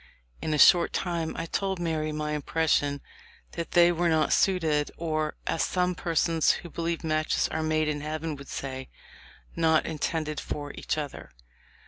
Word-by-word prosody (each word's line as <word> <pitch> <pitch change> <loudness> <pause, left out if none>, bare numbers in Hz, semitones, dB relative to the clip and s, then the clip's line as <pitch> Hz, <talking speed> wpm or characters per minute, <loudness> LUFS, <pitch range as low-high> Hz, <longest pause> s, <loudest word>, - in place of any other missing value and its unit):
In 155 - -2
a 150 - +1
short 170 +3 +6
time 170 -3 -2
I 165 - -2
told 190 +3 -1
Mary 160 -2 -1
my 150 0 -3
impression 150 -1 0 0.5
that 170 -1 -5
they 175 0 +6
were 175 0 +1
not 160 -1 +2
suited, 160 -6 +2
or, 155 -2 -1
as 165 - 0
some 180 0 +1
persons 165 -2 +2
who 170 - -9
believe 170 0 -2
matches 155 -1 +1
are 160 - -2
made 155 0 +1
in 150 -1 -2
heaven 155 +1 -3
would 140 0 -11
say, 130 -1 -5 0.7
not 160 -1 +3
intended 155 -1 -2
for 145 -1 -5
each - - -2
other." 145 -3 -5
160 Hz, 160 wpm, -27 LUFS, 150-170 Hz, 0.7 s, short